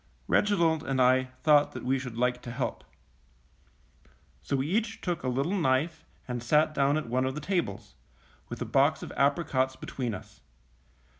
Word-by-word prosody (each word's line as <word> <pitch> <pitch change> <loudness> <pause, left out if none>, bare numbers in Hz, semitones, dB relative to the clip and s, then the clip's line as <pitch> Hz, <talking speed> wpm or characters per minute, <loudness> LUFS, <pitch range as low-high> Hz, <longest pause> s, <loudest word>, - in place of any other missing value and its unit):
Reginald 170 -7 +2
and 135 -4 -2
I 130 +1 +4 0.2
thought 150 -2 +5
that - - -7
we 130 +1 +1
should 125 -3 -7
like 125 0 0
to 120 - -7
help. 125 +2 -3 1.6
So 140 - -2
we 135 0 0
each 220 +6 -1
took 175 -2 -2
a - - -4
little 135 +9 0
knife 155 -1 0 0.2
and 125 -1 -3
sat 150 +5 +3
down 140 0 +2
at 155 - -3
one 125 +2 0
of 130 +1 -2
the - - -3
tables, 175 +3 -3 0.6
with - - -6
a - - -6
box - - +2
of - - -7
apricots 140 -2 +1
between 125 -4 -4
us. - - -13
140 Hz, 170 wpm, -28 LUFS, 130-160 Hz, 1.6 s, thought